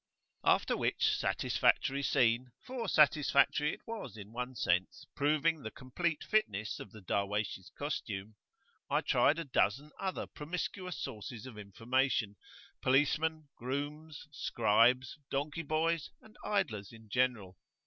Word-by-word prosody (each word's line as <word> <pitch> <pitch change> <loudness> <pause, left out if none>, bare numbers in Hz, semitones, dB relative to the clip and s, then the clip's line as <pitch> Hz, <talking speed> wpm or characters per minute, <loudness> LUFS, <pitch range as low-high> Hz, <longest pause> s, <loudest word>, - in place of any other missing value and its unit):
After - - +3
which - - +2
satisfactory 140 +1 +2
scene, 125 -2 +2
for 250 -3 -4
satisfactory 150 0 +4
it - - -10
was 210 - -6
in 105 0 -10
one 125 +1 -4
sense, 90 -4 0
proving 155 +2 +2
the 110 - -5
complete 150 +7 -2
fitness 105 - 0
of 100 - -9
the 110 - -12
Darwaysh's 100 0 -2
costume, 110 -8 -4 0.5
I - - +2
tried 150 - +3
a 165 - -2
dozen 135 +2 +1
other 190 -1 -2
promiscuous 180 +3 -5
sources 110 +2 -6
of 130 -4 -9
information, 115 +1 0 0.5
policemen, 150 +3 +2
grooms, 145 +5 -5
scribes, 120 +2 +2
donkey 145 +4 -2
boys, 160 +1 0
and 220 - -18
idlers 130 - -1
in 115 -1 -14
general. 105 -6 0
130 Hz, 125 wpm, -33 LUFS, 110-155 Hz, 0.5 s, satisfactory